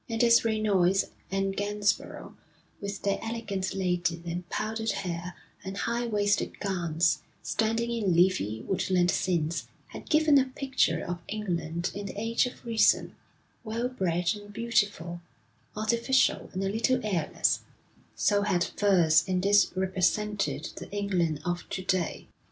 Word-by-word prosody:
And 225 +1 +1
as 235 0 +6
Reynolds 200 -4 +2 0.2
and 195 0 -1
Gainsborough, 205 0 -1 0.5
with 200 -1 -5
their 200 -1 +1
elegant 205 -5 -3
ladies 180 -3 0
in 175 +1 -4
powdered 220 +1 -2
hair 175 -3 -3 0.3
and 190 0 -6
high 235 +2 -1
waisted 205 -2 0
gowns, 170 -4 +1 0.2
standing 225 +1 0
in 210 -7 +1
leafy, 140 - +2
woodland 180 +2 +1
scenes, 170 -3 -1 0.2
had - - -10
given 305 -2 +5
a 265 - +2
picture 260 - 0
of 175 0 -4
England 175 -5 -2
in 200 0 -5
the 200 - -6
age 230 +3 +1
of 250 - -11
Reason, 230 -2 +3 0.5
well 230 +2 -2
bred 180 -7 0
and 205 0 -11
beautiful, 205 -7 -1 0.6
artificial 235 +4 +2
and 190 +1 -3
a 195 - 0
little 230 +5 +1
airless, 180 -7 +1 0.6
so 205 -1 +2
had 190 -4 +1
Furse 170 -6 +3
in 185 -1 +1
this 200 +1 +4
represented 190 +2 0
the - - -8
England 180 -7 -1
of 175 -1 -3
to 185 - -4
day. 185 -2 -1
200 Hz, 140 wpm, -28 LUFS, 175-220 Hz, 0.6 s, as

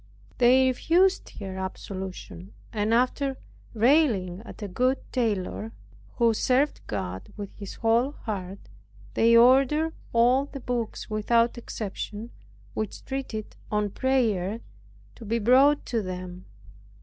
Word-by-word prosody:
They 255 +2 +6
refused 350 +9 +2
her 190 -2 -6
absolution; 190 -1 -7 0.2
and 210 0 0
after 260 +3 +1 0.4
railing 220 - +3
at 220 - -10
a - - -3
good 255 +8 +1 0.2
tailor, 220 -2 -1 0.4
who 235 -2 +3
served 260 +6 +1
God 95 -2 -5
with 200 -2 -7
his 200 -2 -8
whole 235 +5 +2
heart, 195 -7 -5 0.6
they 230 +1 +5
ordered 275 +6 +5 0.2
all 245 +4 +4
the 280 - -8
books 240 -3 -3
without 230 +2 +2
exception, 220 -1 -6 0.4
which 215 -2 -5
treated 260 -6 -5 0.2
on 210 -1 0
prayer 225 -6 0 0.6
to - - -10
be 225 +2 -1
brought 260 +6 +4
to 230 -2 -1
them. 185 -1 -7
230 Hz, 120 wpm, -26 LUFS, 200-255 Hz, 0.6 s, They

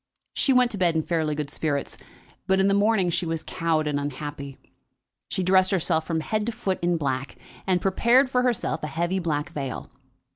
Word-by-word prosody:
She 275 - +2
went 250 -1 +4
to 205 - -6
bed 175 -3 +2
in 160 - +1
fairly 160 -2 -1
good 145 -1 -4
spirits, 145 -3 -2 0.5
but 190 0 +3
in 195 - +4
the 200 - +3
morning 200 -3 +3
she 170 +1 -1
was 165 -1 -2
cowed 160 -2 0
and 145 -1 0
unhappy. 140 -1 -6 0.7
She 190 - -1
dressed 185 +1 +4
herself 160 -4 0
from 160 -2 -1
head 215 +5 -2
to - - 0
foot 195 -4 -2
in 175 0 +1
black, 135 -3 -2 0.3
and 185 -1 +3
prepared 235 +8 +3
for 250 -1 +1
herself 235 -10 0
a 150 - -3
heavy 170 +5 -1
black 160 -2 -2
veil. 140 -5 -5
170 Hz, 195 wpm, -25 LUFS, 150-195 Hz, 0.7 s, went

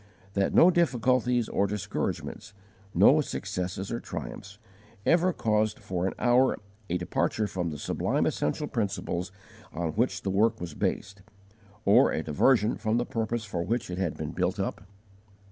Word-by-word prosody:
that 100 -1 +1
no 180 - +7
difficulties 125 -7 +2
or 100 - +1
discouragements, 105 +1 -4 0.4
no 130 - +6
successes 95 -6 -4
or 115 - -2
triumphs, - - -7 0.5
ever 175 +2 +4
caused 110 -6 0
for 90 0 -2
an - - -2
hour 125 +2 +3 0.3
a 90 - +1
departure 110 +4 -1
from 90 -4 -3
the 75 - -5
sublime - - 0
essential 75 - -1
principles 100 -7 -2 0.4
on 85 0 -2
which 115 +9 0
the 95 - -1
work 110 +3 +2
was 85 -3 -6
based, 100 +5 -3 0.6
or 100 - +6
a 80 - -1
diversion 105 - +3
from 110 +1 0
the 120 - 0
purpose 115 0 -2
for 90 -5 -3
which 115 +3 -2
it 90 - -4
had 90 -5 -1
been - - -4
built - - -1
up? - - -3
105 Hz, 155 wpm, -28 LUFS, 95-120 Hz, 0.6 s, no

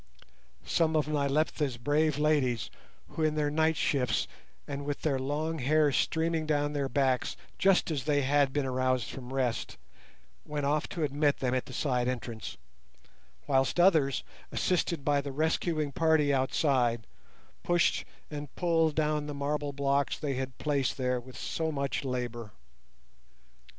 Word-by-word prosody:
Some 160 -1 +1
of 150 -1 +2
Nyleptha's 145 -2 0
brave 145 +4 +1
ladies, 145 -6 +1 0.4
who - - -5
in 155 -1 +2
their 150 -1 0
night 160 +1 +2
shifts 130 -4 +1 0.4
and 140 0 -4
with 145 0 -4
their 140 -4 +1
long 155 +4 -2
hair 150 +3 +3
streaming 160 +2 0
down 145 -1 +1
their 140 -2 -1
backs, 130 -1 +1 0.2
just 195 -3 +3
as 140 -4 -2
they 145 -2 +2
had 140 0 +3
been 145 0 0
aroused 130 -2 0
from 130 -1 -8
rest, 130 -3 -1 0.7
went 150 -1 -3
off 150 +3 +1
to 165 - -3
admit 145 0 +1
them 125 -1 -1
at 130 - -1
the - - -9
side 125 -3 0
entrance, 120 -3 -4 0.9
whilst 135 +4 +1
others, 160 -8 +4 0.3
assisted 170 -4 0
by 145 -1 +3
the 140 0 -5
rescuing 155 +1 0
party 155 -1 +3
outside, 130 -4 +1 0.6
pushed 175 -1 +2 0.3
and 145 -2 -7
pulled 165 -3 +2
down 150 -1 0
the 145 - -5
marble 145 +1 -2
blocks 140 0 0
they 145 -3 -2
had 130 -1 -4
placed 140 -4 0
there 125 -1 0
with 125 +1 -12
so 160 -1 -2
much 140 -1 -2
labour. 120 -4 -3
145 Hz, 150 wpm, -30 LUFS, 130-155 Hz, 0.9 s, others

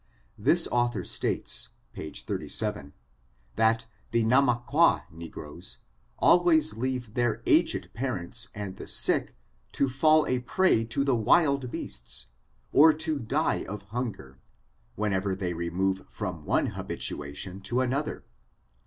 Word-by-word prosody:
This - - +4
author 120 -1 +1
states, - - 0 0.2
page 80 - -6
37, 70 +1 -3 0.6
that 110 0 +2 0.2
the 115 -1 +1
Namacqua 125 +6 +3
negroes 80 +1 -8 0.4
always 160 -11 +4
leave 125 -2 -3
their 120 -1 0
aged - - +3
pa 135 +4 -2
rents 115 +1 -4
and 100 -2 -6
the - - -8
sick - - +1 0.4
to 140 - +2
fall 155 +4 +4
a 125 - 0
prey 125 -2 +2
to 120 +4 0
the 135 -3 +2
wild 135 +3 +3
beasts, 65 - -6 0.5
or 155 +2 +8
to 155 -1 -2
die 115 -4 0
of 105 0 -6
hunger, 100 - -5 0.6
whenever 100 -2 0
they 90 -2 -3
remove 90 +3 -1
from 90 -7 -5
one - - +1
hab - - -7
itation 75 +7 -4
to 120 +6 0
another. 135 +4 -2
115 Hz, 125 wpm, -28 LUFS, 95-130 Hz, 0.6 s, or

